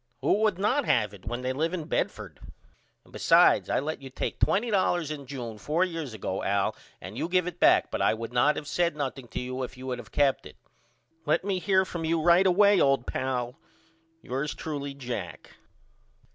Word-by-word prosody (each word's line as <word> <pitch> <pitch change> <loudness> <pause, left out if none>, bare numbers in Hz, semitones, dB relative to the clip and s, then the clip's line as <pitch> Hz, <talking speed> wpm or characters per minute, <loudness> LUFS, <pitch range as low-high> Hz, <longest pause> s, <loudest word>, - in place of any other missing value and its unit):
Who 150 +9 +2
would 215 -4 +2
not 240 +8 +1
have 105 -4 +1
it 100 -1 -14
when 120 +2 -4
they 130 0 -1
live 165 +6 -1
in 170 - -4
Bedford? - - -3 0.6
And - - -22
besides - - +4
I - - +2
let 150 +1 -4
you 135 - -9
take 130 - -4
$20 190 -7 +1
in 140 -3 -7
June 120 -5 -6
4 160 - +1
years 165 -9 -5
ago 95 -2 -3
Al 100 0 0 0.2
and 95 +6 -8
you 165 - -2
give 180 -1 +2
it 180 -1 -6
back - - +4
but - - -2
I - - +3
would 115 +1 -7
not 135 +5 +3
have 150 - -5
said 170 0 0
nothing 135 -3 -4
to 110 - -5
you 130 +1 -4
if 125 0 -6
you 130 +1 -8
had 125 - -3
of 110 -3 -11
kept 140 -2 +1
it. - - -16 0.7
Let 155 - +2
me 195 -2 0
hear 190 0 +2
from 170 -3 -5
you 165 +1 +1
right 175 +4 +5
away 200 +2 +5
old 135 -3 +3
pal. 125 -1 -3 0.6
Yours 135 +4 -3
truly, 140 -3 -5
JACK. 105 - -6
145 Hz, 200 wpm, -27 LUFS, 125-175 Hz, 0.7 s, right